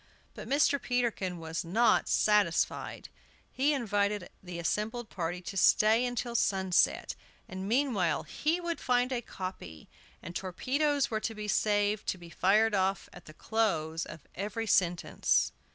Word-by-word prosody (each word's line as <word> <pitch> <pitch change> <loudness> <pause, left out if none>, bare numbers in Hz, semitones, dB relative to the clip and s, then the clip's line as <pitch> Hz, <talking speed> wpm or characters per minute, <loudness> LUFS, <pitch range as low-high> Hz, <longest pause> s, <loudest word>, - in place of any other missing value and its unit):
But - - -9
Mr. 280 0 +3
Peterkin 235 -8 -1
was 165 0 -4
not 220 +8 +2
satisfied. 210 -5 +1 0.4
He 275 +3 +1
invited 205 -7 -1
the 180 -2 -8
assembled 215 +7 -2
party 175 0 -3
to 195 - -7
stay 220 +5 +5
until 245 0 -3
sunset, 190 -5 +1 0.3
and 190 +1 -6
meanwhile 230 - +1
he 320 +4 -1
would 340 -1 -3
find 250 0 +1
a 245 -2 -1
copy, 185 - -8 0.4
and 170 - -8
torpedoes 275 - 0
were 220 - 0
to 225 +1 -4
be 210 0 -6
saved 205 0 +1
to - - -1
be 170 -1 -13
fired 210 +5 +3
off 195 0 0
at 180 - -13
the 155 - -12
close 165 -8 -1
of 155 - -10
every 210 +4 -4
sentence. 175 -4 +2
210 Hz, 145 wpm, -30 LUFS, 180-240 Hz, 0.4 s, stay